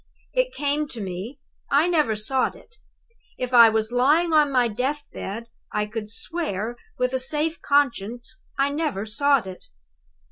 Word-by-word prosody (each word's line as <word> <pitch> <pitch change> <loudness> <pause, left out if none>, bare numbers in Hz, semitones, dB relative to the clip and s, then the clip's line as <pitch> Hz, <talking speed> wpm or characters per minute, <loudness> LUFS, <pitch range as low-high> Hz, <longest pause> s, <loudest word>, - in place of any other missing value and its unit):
"It - - +1
came 295 -2 -1
to 240 - -6
me 195 +7 -6 0.3
I 290 +4 +4
never 305 -10 +2
sought 255 +5 0
it. 475 +2 -19 0.6
If 250 0 -4
I 235 -2 +9
was 220 +1 0
lying 300 +7 +3
on 300 -2 +5
my 250 -2 +3
death 260 +7 -2
bed, 220 +4 -5 0.3
I 210 0 0
could 210 0 -6
swear, 230 - -3 0.2
with 250 +1 0
a 260 - +1
safe 305 +5 -1
conscience, 245 -3 0 0.2
I 275 +1 +2
never 290 -9 -2
sought 280 +2 +2
it. 185 -1 -9
255 Hz, 155 wpm, -24 LUFS, 220-295 Hz, 0.6 s, I